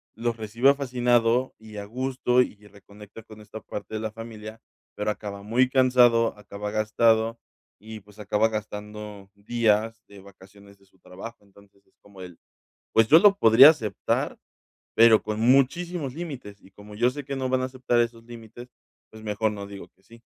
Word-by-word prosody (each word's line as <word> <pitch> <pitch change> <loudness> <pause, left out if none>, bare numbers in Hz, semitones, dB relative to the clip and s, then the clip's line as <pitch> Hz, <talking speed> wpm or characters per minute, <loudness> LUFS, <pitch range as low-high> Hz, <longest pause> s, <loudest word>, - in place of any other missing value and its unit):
los 115 +1 -2
recibe 115 +6 +2
fascinado 125 -2 0
y 110 -1 -12
a 100 - -6
gusto 125 +2 0
y 105 -4 -5
reconecta 105 +2 -15
con 110 -1 -15
esta 110 +1 -11
parte 105 +2 -8
de 110 - -3
la 110 -1 -4
familia, 110 0 -10 0.3
pero 105 +1 -3
acaba 100 -1 -8
muy 125 +4 +1
cansado, 125 -4 +3
acaba 105 0 -7
gastado 110 +1 +1 0.4
y, 110 0 -10
pues, 105 +2 -20
acaba 105 +1 +1
gastando 105 -1 -8
días 110 +1 -1
de 100 -1 -15
vacaciones 100 +1 -18
de 100 - -27
su 95 -1 -32
trabajo. 105 +4 -11
Entonces, 100 0 -24
es - - -37
como 100 -2 -16
él. 90 -2 -11 0.6
Pues 115 0 +4
yo 160 +7 +7
lo 200 0 +5
podría 115 +6 +8
aceptar, 140 -10 -2 0.6
pero 115 -1 +6
con 110 0 -4
muchísimos 140 +4 +1
límites 140 -11 -8
y, 95 - -19
como 105 +1 -14
yo 120 +4 +2
sé 145 +1 -8
que 140 0 -5
no 130 -1 -3
van 130 0 +1
a - - -1
aceptar 130 -2 -1
esos 115 -1 -3
límites, 120 +1 -12 0.4
pues 110 0 -14
mejor 105 0 -1
no 100 -1 -7
digo 100 -1 -11
que 95 - -36
sí. 115 +4 -18
110 Hz, 175 wpm, -25 LUFS, 105-120 Hz, 0.6 s, podría